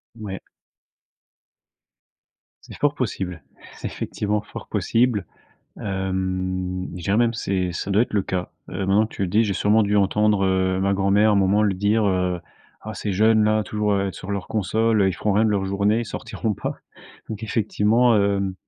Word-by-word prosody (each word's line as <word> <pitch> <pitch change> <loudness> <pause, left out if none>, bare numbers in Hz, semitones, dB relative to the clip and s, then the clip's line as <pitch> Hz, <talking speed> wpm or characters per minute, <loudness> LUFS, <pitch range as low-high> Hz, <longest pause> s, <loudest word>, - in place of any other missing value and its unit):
Ouais. 105 -4 -6 2.2
C'est - - -11
fort - - +1
possible. 90 -4 -3 0.3
C'est - - -5
effectivement 105 0 -2
fort - - -10
possible. 115 -5 +1 0.6
Hem, 95 -1 -2
je 90 - -7
dirais 100 +4 +1
même 120 0 +2
c'est 95 -4 -1
ça 95 - -4
doit 100 +3 +4
être 120 - -4
le 100 -2 +2
cas. 90 -1 -3 0.2
Heu, 90 - -5
maintenant 100 +3 +2
que - - -14
tu - - -3
le 95 - 0
dis, 110 +6 +3
j'ai 100 - 0
sûrement 105 +4 +3
dû 105 0 +1
entendre, 105 0 +2
heu, 95 0 +1
ma 100 +1 +1
grand-mère, 100 +2 +3
à - - +4
un 100 - +3
moment, 100 +2 +3
le 100 -3 +2
dire, 105 +3 +2
heu: 90 -2 0 0.5
«Ah 110 - -4
ces 100 0 -3
jeunes-là, 110 +1 +3
toujours, 105 -1 -1
heu, 100 -1 0
sur 95 - -8
leurs 100 -2 -3
consoles, 110 +2 +1
heu, 95 - +4
ils 95 - 0
font 105 - -1
rien 105 +3 +3
de 110 - +2
leurs 100 -2 0
journées, 100 +3 +1
ils - - -3
sortiront 110 +1 -3
pas.». - - -4 0.5
Donc 110 0 -6
effectivement, 110 +2 +2
hem, 100 -2 +1
100 Hz, 185 wpm, -23 LUFS, 95-105 Hz, 2.2 s, doit